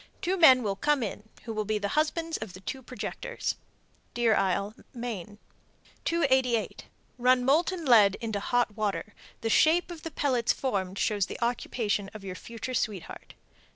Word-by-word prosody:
Two 380 0 0
men 265 -8 +7
will 200 -2 -1
come 290 +3 +1
in 215 +1 -6
who 225 - -5
will 215 0 -1
be 215 +1 -1
the 200 -1 -2
husbands 320 +3 0
of 215 -4 -7
the 185 - -10
two 265 +7 -5
projectors. 260 - -4 0.6
Deer 235 -2 +3
Isle, 200 +2 0 0.2
Me. 215 -5 -5 0.7
288. 260 -8 +1 0.3
Run 250 0 +4
molten 335 +5 +2
lead 210 -6 +6
into 220 -3 -3
hot 240 0 0
water; 210 -1 -2 0.3
the 225 - -1
shape 340 - +4
of 335 -2 -8
the 325 - -5
pellets 255 -7 +1
formed 195 -7 -2
shows 205 -2 +1
the - - -6
occupation 230 -4 -1
of 215 - -8
your 190 -1 -5
future 230 +6 -7
sweetheart. 210 -7 -4
235 Hz, 160 wpm, -28 LUFS, 205-275 Hz, 0.7 s, men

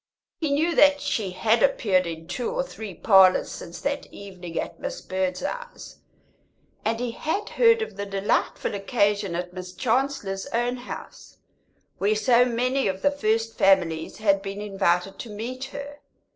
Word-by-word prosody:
He 315 -3 -1
knew 320 +4 +2
that 290 -2 +6
she 210 -8 -1
had 220 +5 +1
appeared 190 -9 +3
in 165 -1 -7
two 245 - -3
or - - -1
three 220 - -8
parlours 190 0 +5
since 170 - -8
that 285 0 -2
evening 185 -4 -7
at - - -5
Miss - - -4
Birdseye's, 190 - -4 0.9
and 225 +1 0
he 245 -1 -2
had 320 - -3
heard 460 -1 +4
of 445 - -8
the 200 0 -4
delightful 195 +1 0
occasion 200 -2 0
at 180 +1 -4
Miss 180 0 -7
Chancellor's 230 -5 -1
own 240 +2 -1
house, 245 - -9 0.6
where 205 +2 +2
so 235 +3 +4
many 250 +2 0
of 190 0 -3
the 285 - +4
first 225 -4 -1
families 170 -5 +2
had 200 -2 +2
been 195 0 -6
invited 195 -2 0
to 235 - -7
meet 240 +5 -5
her. 285 +1 -8
215 Hz, 160 wpm, -25 LUFS, 195-265 Hz, 0.9 s, that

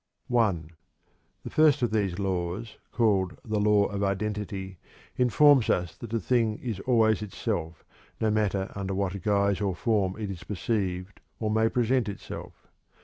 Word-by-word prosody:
I. 105 -8 +3 0.8
The - - -7
first 150 -3 +4
of 120 - +1
these 100 -5 0
laws, 95 +2 -3
called 100 -6 +1
"The 110 -2 -1
Law 105 -1 +4
of 100 0 -3
Identity," 100 -2 -3 0.4
informs 130 +1 +5
us 90 -2 0
that 115 - -9
a - - +1
thing 110 0 +1
is 115 -6 -4
always 110 -2 +3
itself, 85 -5 -4 0.3
no 110 -1 +1
matter 100 -3 0
under 95 -1 -3
what 100 0 -2
guise 100 0 +1
or 95 -3 0
form 100 -1 0
it 105 -3 -4
is 90 -2 -8
perceived 95 -1 -3 0.2
or 110 -1 -1
may 110 +1 +3
present 125 -1 +1
itself. 100 - -9
105 Hz, 150 wpm, -27 LUFS, 95-110 Hz, 0.8 s, informs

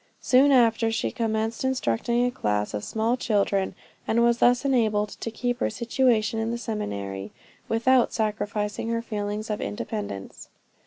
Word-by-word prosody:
Soon 265 +3 +4
after 230 -3 +4
she 225 - -1
commenced 225 0 -2
instructing 240 - +1
a 245 - 0
class 105 - -1
of 105 -1 -3
small 225 +2 0
children, 200 -5 0 0.3
and 235 +1 +3
was 235 0 +3
thus 245 +3 +4
enabled 215 -6 +2
to 230 - -6
keep 245 +1 -2
her - - +1
situation 230 -1 +1
in 225 0 -1
the 235 - -2
seminary, 100 - -4 0.4
without 240 +2 +3
sacrificing 210 -1 -2
her 230 0 -1
feelings 210 0 -3
of 210 - -3
independence. 205 - -5
225 Hz, 150 wpm, -25 LUFS, 210-235 Hz, 0.4 s, Soon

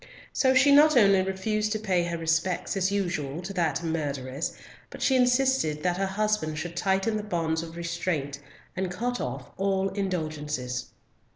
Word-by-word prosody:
So 260 -1 +3
she 275 +2 +6
not 295 0 +7
only 195 -4 +6
refused 210 +3 -1
to - - 0
pay 190 -5 +1
her 170 0 -3
respects 165 +4 0
as 195 0 +1
usual 170 -7 -2
to 195 +2 -5
"that 165 -4 0
murtheress," 145 -3 -3 0.4
but - - -10
she 265 - +3
insisted 250 - +2
that 180 -1 +1
her 195 0 0
husband 195 -6 -1
should 170 +2 -5
tighten 195 +4 +1
the - - -2
bonds 165 -5 -1
of 165 0 -8
restraint, 170 -4 -2 0.4
and 185 0 -2
cut 245 +7 -2
off 125 +1 -5
all 195 0 +1
indulgences. 155 -9 -3
180 Hz, 165 wpm, -27 LUFS, 160-210 Hz, 0.4 s, not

